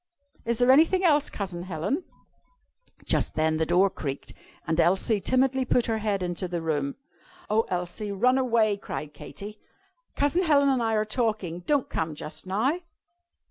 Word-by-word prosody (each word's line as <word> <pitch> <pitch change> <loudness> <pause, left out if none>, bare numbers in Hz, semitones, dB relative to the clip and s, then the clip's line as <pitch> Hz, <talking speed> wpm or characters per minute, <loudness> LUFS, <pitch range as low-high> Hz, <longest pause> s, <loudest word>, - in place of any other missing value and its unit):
Is 235 0 0
there 245 +2 +5
anything 330 +7 +4
else, 300 -4 +4
Cousin 185 -4 -5
Helen?" 185 - -2 1.0
Just - - 0
then 155 0 +1
the 160 0 0
door 180 +3 +4
creaked, 140 -6 -5 0.3
and 160 +1 -1
Elsie 190 +5 +3
timidly 260 +2 +2
put 245 -1 +2
her 225 -1 -1
head 205 -3 -1
into 175 +1 -3
the 175 -1 -3
room. 145 -4 -2 0.6
"Oh, 225 +1 +2
Elsie, 180 +4 -3
run 250 +7 +3
away!" 225 -5 +2
cried 150 -6 -6
Katy. 205 +8 -9 0.6
"Cousin 290 +5 +2
Helen 285 -5 +4
and 260 -3 +2
I 225 -1 +1
are 215 0 +1
talking. 215 -7 -1
Don't 290 -3 +2
come 160 -1 -3
just 155 +4 -5
now." 240 - +1
210 Hz, 160 wpm, -26 LUFS, 175-255 Hz, 1.0 s, there